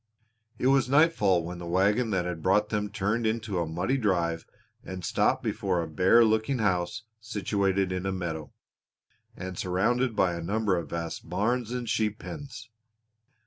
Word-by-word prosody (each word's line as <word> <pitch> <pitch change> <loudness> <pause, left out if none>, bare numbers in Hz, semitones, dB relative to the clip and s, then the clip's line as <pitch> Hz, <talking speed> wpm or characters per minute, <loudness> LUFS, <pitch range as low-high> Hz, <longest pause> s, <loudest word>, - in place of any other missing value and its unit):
It - - -3
was 135 -1 +4
nightfall 135 - +4
when 85 +1 -6
the 85 - -7
wagon 100 +7 +2
that 95 -4 0
had 90 -2 -4
brought 105 +5 +2
them 105 -2 -1
turned 110 +2 0
into 110 -4 -1
a 85 - -1
muddy 90 +12 -1
drive 85 -8 0 0.4
and 95 -2 -6
stopped - - +1
before 95 -3 -1
a 85 - -2
bare 90 +9 +5
looking 110 +4 +1
house 95 0 0 0.2
situated 100 -3 0
in 90 +1 -2
a - - 0
meadow, 85 -5 -4 0.9
and 90 -1 -6
surrounded 115 +7 +1
by 90 -4 +2
a 85 - -4
number 100 +3 0
of 85 -3 -4
vast 85 -1 -5
barns 120 +2 0
and 125 -1 -3
sheep 110 -1 0
pens. 125 -7 -9
100 Hz, 165 wpm, -28 LUFS, 90-110 Hz, 0.9 s, bare